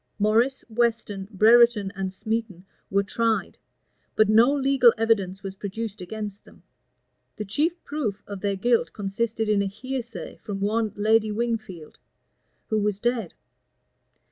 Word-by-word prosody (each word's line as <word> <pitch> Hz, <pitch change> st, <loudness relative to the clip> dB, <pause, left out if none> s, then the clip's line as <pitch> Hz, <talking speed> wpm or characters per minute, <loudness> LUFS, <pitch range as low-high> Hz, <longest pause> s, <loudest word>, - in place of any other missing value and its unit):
Morris, 225 Hz, +6 st, +2 dB
Weston, 225 Hz, -4 st, -1 dB
Brereton, 220 Hz, 0 st, +5 dB
and 190 Hz, 0 st, -2 dB
Smeton, 215 Hz, -2 st, -4 dB, 0.2 s
were 200 Hz, +1 st, +2 dB
tried; 225 Hz, +2 st, -1 dB, 0.6 s
but 215 Hz, -1 st, +4 dB
no 225 Hz, +5 st, +6 dB
legal 270 Hz, -3 st, +4 dB
evidence 200 Hz, -4 st, 0 dB
was 195 Hz, -1 st, -5 dB
produced 205 Hz, +2 st, -6 dB
against 205 Hz, +2 st, -6 dB
them. -, -, -19 dB, 0.7 s
The 210 Hz, -, -5 dB
chief 310 Hz, -, -1 dB
proof 250 Hz, -9 st, -3 dB
of 200 Hz, -2 st, -7 dB
their 200 Hz, -1 st, 0 dB
guilt 235 Hz, +4 st, +1 dB
consisted 220 Hz, +2 st, -2 dB
in 210 Hz, -1 st, +2 dB
a 200 Hz, -, 0 dB
hearsay 235 Hz, 0 st, -6 dB
from 205 Hz, -3 st, -6 dB
one 215 Hz, +2 st, 0 dB
Lady 215 Hz, +1 st, +2 dB
Wingfield, 215 Hz, -8 st, -4 dB, 0.7 s
who 215 Hz, -, +1 dB
was 210 Hz, -1 st, 0 dB
dead. 230 Hz, -4 st, -2 dB
215 Hz, 135 wpm, -25 LUFS, 200-235 Hz, 0.7 s, no